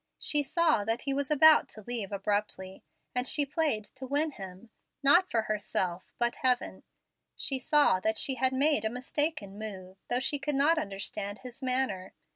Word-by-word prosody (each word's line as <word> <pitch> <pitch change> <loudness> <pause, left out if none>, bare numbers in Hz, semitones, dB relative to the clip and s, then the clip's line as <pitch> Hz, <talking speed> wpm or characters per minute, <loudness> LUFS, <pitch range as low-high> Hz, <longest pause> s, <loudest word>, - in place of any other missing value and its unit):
She 295 - +1
saw 315 - +2
that 225 +2 -2
he 275 - -1
was 280 0 -2
about 310 +1 +6
to 215 - -9
leave 225 -3 -4
abruptly. 200 -1 -3 0.3
As 250 +1 +1
she 290 - +2
played 285 -7 0
to 260 +4 -10
win 295 +3 0
him, 195 0 -10 0.3
not 345 +7 +5
for 225 -2 0
herself, 195 -4 -2
but 240 0 0
heaven, 250 -1 +1 0.5
she 270 -2 -1
saw 290 -8 +3
that 220 +3 -1
she 270 - +1
had 260 +1 +1
made 275 -2 +2
a 220 - 0
mistaken 250 -4 -2
move, 190 -3 -8
though 245 - +1
she 280 +3 -1
could 280 +1 -2
not 310 +4 +3
understand 200 -2 -4
his 250 +1 -10
manner. 255 -8 -1
250 Hz, 175 wpm, -29 LUFS, 205-285 Hz, 0.5 s, about